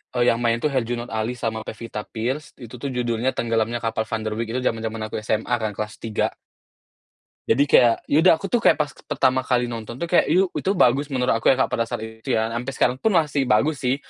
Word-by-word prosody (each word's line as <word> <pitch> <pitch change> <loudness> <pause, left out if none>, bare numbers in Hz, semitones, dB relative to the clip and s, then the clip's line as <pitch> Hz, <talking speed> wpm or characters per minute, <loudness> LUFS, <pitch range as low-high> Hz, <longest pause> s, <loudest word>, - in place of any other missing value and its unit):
eee, 120 0 +2
yang - - +4
main 115 0 +2
tuh 135 - +1
Herjunut 120 -1 -2
Ali 110 +2 -2
sama 110 -1 -3
Pevita 110 -1 -6
Pierce, 130 +8 -4
itu 120 -1 -10
tuh 135 +3 -5
judulnya 120 0 0
Tenggelamnya 115 0 -1
Kapal 115 -1 -1
Van 115 - -1
der 110 - -2
Wijck 115 0 -3
itu - - -1
jaman-jaman 110 0 -3
aku - - -7
SMA 110 +3 0
kan 110 -2 -2
kelas 105 0 -4
3. 110 -2 0 1.2
Jadi 130 +5 +4
kayak, 120 -5 +4
ya 145 - +5
udah 175 +2 +6
aku 165 +5 -7
tuh 240 - +3
kayak - - +5
pas 150 -2 -1 0.2
pertama 130 -1 +2
kali 125 -2 0
nonton 115 0 -6
tuh 130 - -5
kayak, 170 +1 +3
yu 185 +3 +3
itu 195 +2 -1
bagus 140 -3 +3
menurut 130 -3 0
aku - - -1
ya 135 - +6
Kak, - - -3
pada 115 -1 0
saat 110 - -4
itu 110 +3 -4
ya, 110 +1 0
sampai 120 +3 -3
sekarang 125 +1 +2
pun 220 +2 +1
masih 145 -5 +1
bagus 135 +8 +2
sih. 125 0 +1
120 Hz, 230 wpm, -23 LUFS, 115-135 Hz, 1.2 s, udah